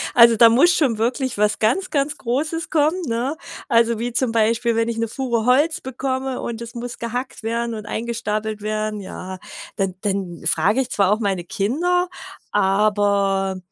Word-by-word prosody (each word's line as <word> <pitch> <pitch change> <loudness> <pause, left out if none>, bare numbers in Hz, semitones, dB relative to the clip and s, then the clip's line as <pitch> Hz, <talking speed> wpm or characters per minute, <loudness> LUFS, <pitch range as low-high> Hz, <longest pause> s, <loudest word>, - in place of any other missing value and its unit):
also 235 -1 +8
da 230 +1 +7
muss 300 +10 +5
schon 265 -10 +2
wirklich 245 +2 -1
was 210 +1 +1
ganz 250 - +1
ganz 285 0 0
Großes 305 +7 -2
kommen, 315 +3 +2
ne? 245 +7 -2 0.3
Also 230 -1 +3
wie 240 0 -3
zum 240 -1 +1
Beispiel, 230 +1 +1
wenn 230 +1 +1
ich 230 - -3
'ne 230 - 0
Fuhre 235 -2 -2
Holz 290 +6 +3
bekomme 260 0 -3
und 235 -1 -4
es 235 - -9
muss 240 0 -6
gehackt 240 0 -5
werden 235 +1 -2
und 215 -1 -7
eingestapelt 220 -2 -3
werden, 215 0 -2
ja, 185 -1 -7 0.4
dann 195 -2 -1
dann 195 -4 -3
frag 185 +8 +2
ich 265 -2 0
zwar 200 -3 +2
auch 215 - +2
meine 195 -5 -1
Kinder, 340 - 0 0.4
aber 200 -1 +2
230 Hz, 170 wpm, -21 LUFS, 210-260 Hz, 0.4 s, also